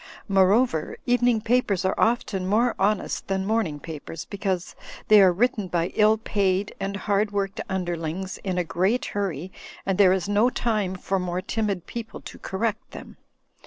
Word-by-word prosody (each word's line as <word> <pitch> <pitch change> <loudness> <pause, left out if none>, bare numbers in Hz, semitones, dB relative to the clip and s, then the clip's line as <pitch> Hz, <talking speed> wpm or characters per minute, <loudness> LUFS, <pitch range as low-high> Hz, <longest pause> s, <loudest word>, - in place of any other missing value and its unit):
Moreover, 195 -2 +2
evening 245 -2 +3
papers 215 -5 +1
are 190 - +2
often 210 -5 0
more 230 +5 +2
honest 200 +1 0
than 190 0 -1
morning 200 -9 0
papers, 160 +1 -7
because 190 -3 -3 0.3
they 210 -1 +8
are 190 -2 +7
written 210 +1 0
by 175 0 0
ill 215 +1 +4
paid 200 -2 0
and 195 +1 -3
hardworked 200 -1 -1
imderlings 180 0 -3
in 185 -2 -3
a 180 - +2
great 190 +9 0
hurry, 190 -4 -3 0.3
and 195 -1 -1
there 190 -2 +7
is 190 0 0
no 205 +4 +3
time 215 -7 -1
for 190 +1 -1
more 180 0 -2
timid 200 -2 -2
people 230 -2 -7
to - - -10
correct 220 +3 -3
them. - - -11
195 Hz, 160 wpm, -25 LUFS, 185-215 Hz, 0.3 s, they